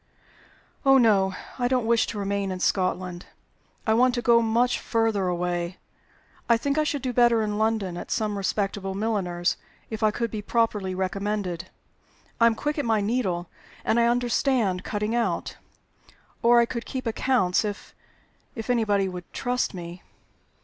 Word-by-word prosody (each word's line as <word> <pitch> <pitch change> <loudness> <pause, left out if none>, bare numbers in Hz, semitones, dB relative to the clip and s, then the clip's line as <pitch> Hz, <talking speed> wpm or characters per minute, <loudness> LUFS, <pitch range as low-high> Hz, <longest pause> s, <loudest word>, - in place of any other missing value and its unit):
"Oh 270 -1 +6
no! 195 -6 +3 0.2
I 245 - +2
don't 250 -2 +1
wish 230 0 +3
to 215 - -5
remain 200 -1 -1
in 185 - -4
Scotland. 185 -1 -1 0.6
I 220 - +3
want 245 +2 +4
to 240 - -1
go 235 -1 +5
much 235 +2 +2
further 225 -4 0
away. 175 0 -2 0.7
I 235 - +6
think 280 +5 0
I - - +3
should 295 -3 -2
do 255 -1 -1
better 235 -2 +4
in 210 0 -2
London; 215 -5 0
at - - -7
some 210 -2 -1
respectable 195 -1 -2
milliner's, 190 -5 -1 0.3
if 220 0 -4
I 215 - +4
could 230 +1 -2
be 215 - -4
properly 210 -4 0
recommended. 190 -1 -2 0.7
I 230 - +6
am 230 - +2
quick 295 +5 -2
at - - 0
my 225 -2 +2
needle, 200 -6 -1 0.4
and 225 - +2
I 235 - +4
understand 240 -5 +1
cutting 210 +1 -2
out. 235 -1 -1 0.8
Or 240 +1 +6
I 235 - +5
could 235 0 -5
keep 260 -2 -4
accounts, 225 -5 +1
if 205 -1 -5 0.6
if 225 +1 -3
anybody 205 -5 +2
would 180 -1 -8
trust 250 -4 -1
me." 175 0 -8
220 Hz, 165 wpm, -25 LUFS, 190-235 Hz, 0.8 s, Oh